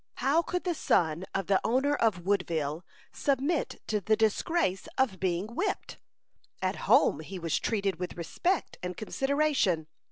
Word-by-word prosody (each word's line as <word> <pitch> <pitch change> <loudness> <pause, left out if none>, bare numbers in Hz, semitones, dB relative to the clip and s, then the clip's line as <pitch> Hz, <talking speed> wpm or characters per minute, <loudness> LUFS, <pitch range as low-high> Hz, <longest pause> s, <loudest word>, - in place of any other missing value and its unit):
How 280 +6 +2
could 360 +1 -3
the 355 - 0
son 170 - +1
of 195 -1 0
the 195 0 +2
owner 265 +5 +2
of 215 -10 +1
Woodville 165 -5 0 0.3
submit 280 +3 -1
to 210 -2 -1
the 215 +4 +3
disgrace 220 - +1
of 235 -9 +1
being 185 +4 -1
whipped? 385 - -2 0.6
At - - -1
home 145 - +5
he 185 +5 -7
was 165 -3 -1
treated 195 -6 -1
with 180 -1 -5
respect 345 - -1
and 180 0 -5
consideration. 270 - +1
205 Hz, 150 wpm, -29 LUFS, 180-280 Hz, 0.6 s, home